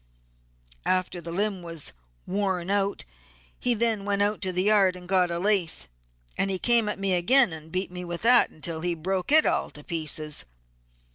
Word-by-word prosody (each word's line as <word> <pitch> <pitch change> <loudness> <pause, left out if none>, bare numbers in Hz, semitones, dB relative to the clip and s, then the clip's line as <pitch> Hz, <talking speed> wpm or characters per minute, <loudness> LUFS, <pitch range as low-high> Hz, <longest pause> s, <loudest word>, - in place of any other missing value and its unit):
After 185 -1 -1
the 170 0 -6
limb 200 +1 +1
was 165 -3 -5 0.3
worn 190 -2 -2
out 200 0 -1 0.5
he 245 -1 +2
then 225 -2 0
went 200 0 0
out 205 +1 -1
to 190 -2 -2
the 180 +1 -1
yard 200 -3 +3
and 180 -1 -11
got 180 -1 +2
a 170 - -3
lath, 180 - 0 0.5
and 195 - +1
he 190 - +1
come 230 +1 +2
at - - -3
me 195 -1 0
again 210 +3 +4
and 160 0 -10
beat 185 +1 -3
me 180 0 -7
with 175 +1 -6
that 245 +1 +5
until 160 +1 -6
he 175 0 -1
broke 185 - -3
it 310 +1 +6
all - - 0
to 150 - -9
pieces. 155 -2 +1
185 Hz, 190 wpm, -26 LUFS, 170-205 Hz, 0.5 s, it